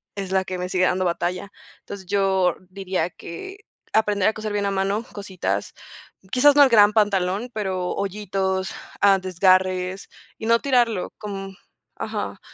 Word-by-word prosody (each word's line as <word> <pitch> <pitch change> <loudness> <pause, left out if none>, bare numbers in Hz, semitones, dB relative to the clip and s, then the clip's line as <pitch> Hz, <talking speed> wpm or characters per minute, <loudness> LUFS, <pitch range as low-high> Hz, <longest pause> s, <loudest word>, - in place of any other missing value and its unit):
es 195 -2 -5
la 190 -1 +1
que 185 -1 -4
me 180 0 -4
sigue 185 -1 +2
dando 185 +1 +1
batalla. 180 +3 -2 0.3
Entonces, 200 -2 -9
yo 190 -2 +2
diría 185 -3 -2
que 385 - -9 0.3
aprender 210 -2 +3
a 220 - -3
coser 215 -1 -5
bien 205 -1 0
a 200 - 0
mano 195 +3 0
cositas, 200 -3 -3 0.6
quizás, 285 +3 +5
no 290 - +8
el 270 - +5
gran 210 -2 +6
pantalón, 205 +1 +1
pero 190 -4 -2
hoyitos, 190 -1 -2 0.3
ah, 195 -1 +5
desgarres 185 0 +1 0.3
y 220 - -7
no 230 0 +4
tirarlo, 240 -8 +1
com 195 -2 -6 0.4
ajá, - - -4
195 Hz, 155 wpm, -23 LUFS, 185-210 Hz, 0.6 s, no